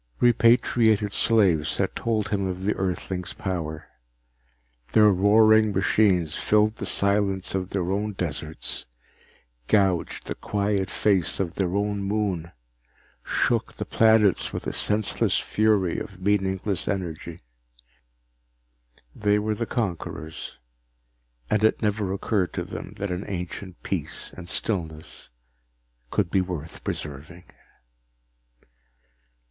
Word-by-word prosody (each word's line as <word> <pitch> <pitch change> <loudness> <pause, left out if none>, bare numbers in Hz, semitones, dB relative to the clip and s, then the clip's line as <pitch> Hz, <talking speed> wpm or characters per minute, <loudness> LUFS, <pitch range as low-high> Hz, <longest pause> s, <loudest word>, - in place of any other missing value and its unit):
Repatriated 115 -2 +4
slaves 95 -9 +3
had - - -1
told 110 -2 -1
him 100 -2 0
of 95 0 -4
the 105 - +1
Earthlings' 90 -1 -3
power. 80 -5 -4 1.1
Their 105 -1 +7
roaring 110 +2 +5
machines 95 -4 +2
filled 105 +1 +2
the - - -4
silence 100 -1 +1
of 95 -1 -2
their 95 -2 -1
own 105 +2 -1
deserts, 80 -3 -4 0.8
gouged 95 -5 +1
the - - -3
quiet 100 -2 -1
face 95 -5 +1
of 90 -4 -1
their 95 -1 -1
own 100 0 0
moon, 100 -5 -1 0.7
shook - - 0
the - - -5
planets 110 -3 +3
with - - -5
a - - -3
senseless 105 0 +1
fury 105 -5 +1
of 100 -2 -8
meaningless 95 0 0
energy. 85 -3 -4 1.7
They 105 0 +2
were 105 +1 0
the 115 +2 -3
conquerors, 85 -7 -4 0.9
and 105 - +1
it 110 - +3
never 105 -2 0
occurred 95 -1 -1
to - - -2
them - - -7
that 100 -2 -3
an 90 +2 -3
ancient 90 -1 -6
peace - - -4
and 90 -1 -9
stillness 80 -8 -4 0.8
could 85 - 0
be 95 - +3
worth 90 -4 -6
preserving. 75 +5 -6
100 Hz, 115 wpm, -25 LUFS, 90-105 Hz, 1.7 s, Their